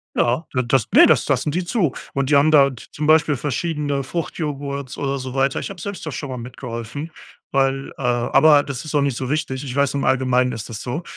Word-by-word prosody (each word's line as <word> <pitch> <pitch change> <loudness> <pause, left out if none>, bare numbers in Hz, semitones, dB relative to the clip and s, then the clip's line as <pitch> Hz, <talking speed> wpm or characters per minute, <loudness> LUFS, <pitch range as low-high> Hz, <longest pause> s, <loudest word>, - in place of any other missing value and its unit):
Ja, 125 +7 +1
d 130 - +1
das - - +2
ne, - - +9
das - - +3
lassen 150 - +1
die 180 +5 -1
zu. 175 - 0 0.2
Und 140 0 -1
die 145 - +4
haben 145 +3 +5
da 140 -3 +7
z 115 - -14
zum 150 0 -3
Beispiel 155 -3 +4
verschiedene 145 0 -2
Fruchtjoghurts 140 -3 -4
oder 140 -1 -2
so 130 -1 -6
weiter. 135 0 +1
Ich - - -5
habe 195 -3 -9
selbst 190 -2 -6
da 155 - -4
schon 140 0 -5
mal 130 - -5
mitgeholfen, 120 +4 -7 0.4
weil, 135 0 0
äh - - -9
aber 135 +5 +4
das 140 -4 -6
ist 155 - -7
auch 145 - +3
nicht 140 -3 0
so 130 +1 -4
wichtig. 140 -3 -2
Ich 130 -3 -5
weiß, 140 0 +1
im 140 - -1
Allgemeinen 125 -1 +2
ist 115 -3 -6
das 115 -2 -7
so. 135 +8 -4
140 Hz, 230 wpm, -21 LUFS, 130-150 Hz, 0.4 s, ne